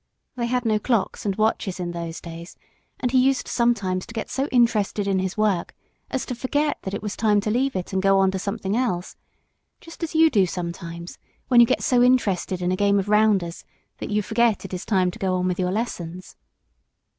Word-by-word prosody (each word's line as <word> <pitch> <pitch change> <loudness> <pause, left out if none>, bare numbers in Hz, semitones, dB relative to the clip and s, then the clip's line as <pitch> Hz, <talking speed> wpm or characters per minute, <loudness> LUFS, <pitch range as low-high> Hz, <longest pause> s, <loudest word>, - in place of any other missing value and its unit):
They 240 -2 -2
had 250 0 -1
no 215 -1 +2
clocks 215 -2 -1
and 195 - 0
watches 215 -3 0
in 175 -1 -3
those 170 -1 -5
days, 170 0 -10 0.4
and 250 - -1
he 260 - +4
used 265 +1 +2
sometimes 200 -7 0
to 230 - -11
get 225 - -4
so 270 +2 -1
interested 220 -5 +2
in 195 -1 +1
his 190 +1 -3
work 205 -5 0 0.3
as 265 - -2
to - - -4
forget 290 +5 -1
that 190 +1 -4
it - - -6
was 210 -1 -4
time 210 -2 +3
to 210 - -1
leave 265 +3 0
it 185 +1 -4
and 190 - +1
go 195 0 +4
on 190 0 +3
to 190 - -3
something 200 0 -3
else, 220 -8 -1 0.6
just 330 +1 -13
as 330 -1 -4
you 320 0 +5
do 195 -6 +3
sometimes 170 -1 -6 0.3
when 245 - +6
you 235 - +8
get - - 0
so 245 -2 +3
interested 200 -7 +2
in 180 - +1
a - - +1
game 200 +1 +2
of 200 +1 -1
rounders 210 -5 +2 0.4
that - - -5
you 210 0 0
forget 225 0 +2
that - - -10
it - - 0
is 180 - -6
time 185 -4 +2
to 230 - -12
go 190 -3 0
on 180 0 0
with 180 0 -2
your 180 0 0
lessons. 185 -5 -4
205 Hz, 225 wpm, -23 LUFS, 185-235 Hz, 0.6 s, you